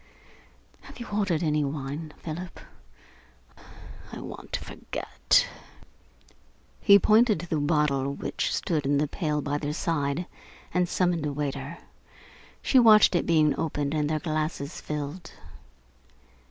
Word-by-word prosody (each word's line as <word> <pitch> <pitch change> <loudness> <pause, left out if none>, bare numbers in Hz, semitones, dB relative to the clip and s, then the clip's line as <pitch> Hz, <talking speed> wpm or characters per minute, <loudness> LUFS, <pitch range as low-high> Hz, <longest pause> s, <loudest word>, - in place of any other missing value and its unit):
Have - - -13
you 235 - -6
ordered 195 -6 0
any 150 -1 +1
wine, 145 +2 -4
Philip? 175 +3 -7 1.5
I - - -7
want - - -9
to - - -2
forget." - - 0 1.3
He 200 -1 +7
pointed 215 -1 +4
to 175 - -7
the 160 - -1
bottle 145 -2 +1
which - - -2
stood 155 -4 -1
in 145 0 +2
the 150 +1 +1
pail 150 -2 -2
by 145 0 -1
their 145 0 -3
side, 155 0 -1 0.5
and 180 -1 +1
summoned 175 -5 +1
a - - -2
waiter. 140 +2 -4 0.9
She 265 - +5
watched 215 -4 +7
it 175 - +1
being 155 -3 +4
opened 150 -2 -1
and 150 -1 0
their 155 - +1
glasses 155 -2 -3
filled. 150 +3 -5
155 Hz, 130 wpm, -27 LUFS, 145-175 Hz, 1.5 s, He